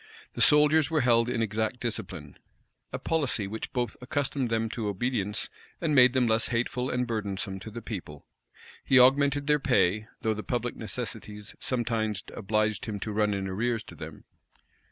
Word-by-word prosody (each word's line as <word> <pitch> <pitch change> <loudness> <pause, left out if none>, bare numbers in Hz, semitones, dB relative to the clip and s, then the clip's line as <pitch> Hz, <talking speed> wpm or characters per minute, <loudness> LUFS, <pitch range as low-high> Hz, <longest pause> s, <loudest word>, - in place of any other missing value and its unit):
The - - -4
soldiers 150 0 +5
were 160 -2 +2
held 120 -1 +3
in 120 -2 0
exact 110 +3 -2
discipline; 95 -10 -5 0.5
a - - -3
policy 140 -10 0
which 110 +3 -5
both 120 -3 -2
accustomed 135 0 -1
them 115 0 0
to 110 -1 -3
obedience, 105 0 -1 0.3
and 160 -3 0
made 130 -2 +7
them 130 -2 +3
less 110 0 +2
hateful 125 +2 -1
and 125 0 0
burdensome 100 -3 -3
to 100 - -8
the 115 +1 -8
people. 90 -10 -7 0.6
He 130 - +4
augmented 140 +2 +4
their 150 0 +3
pay; 110 -6 +2 0.2
though 110 - +2
the 105 - -5
public 120 +1 -2
necessities 110 -2 -6
sometimes 115 -5 -1
obliged 110 +2 0
him 105 -3 -4
to 110 - -3
run 105 -1 +1
in 95 -1 -3
arrears 115 +4 -1
to - - -12
them. - - -9
115 Hz, 170 wpm, -28 LUFS, 105-125 Hz, 0.6 s, made